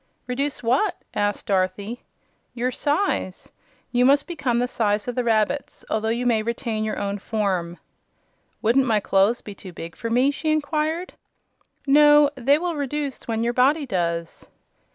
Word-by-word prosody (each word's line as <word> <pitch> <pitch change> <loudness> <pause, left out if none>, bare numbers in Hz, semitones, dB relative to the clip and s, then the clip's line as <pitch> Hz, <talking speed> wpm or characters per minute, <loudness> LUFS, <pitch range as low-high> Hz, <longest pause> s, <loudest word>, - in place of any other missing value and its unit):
"Reduce 275 +3 -2
what?" 255 - +2 0.2
asked 205 0 -1
Dorothy. 200 +4 -1 0.5
"Your 250 +1 -1
size. 290 - -1 0.4
You 245 0 +3
must 280 +3 +4
become 265 -9 -1
the 245 +1 +1
size 210 -3 0
of 245 - -2
the 250 - -1
rabbits, 230 +4 0
although 220 0 0
you 235 +2 -1
may 230 -3 +3
retain 230 -1 -2
your 215 - -2
own 200 0 -2
form." 190 -5 -2 0.9
"Wouldn't 255 +4 +3
my 220 -2 +3
clothes 200 +4 +2
be 205 - -9
too 195 -1 -11
big 165 0 -8
for 230 - -5
me?" 250 +4 +3
she 310 +2 -2
inquired. 310 +3 -1 0.7
"No; 295 +1 +6
they 275 +1 +3
will 345 +1 -2
reduce 285 -1 -4
when 225 -1 -1
your 240 +1 0
body 280 +5 +3
does." 170 -6 -3
240 Hz, 155 wpm, -23 LUFS, 210-285 Hz, 0.9 s, No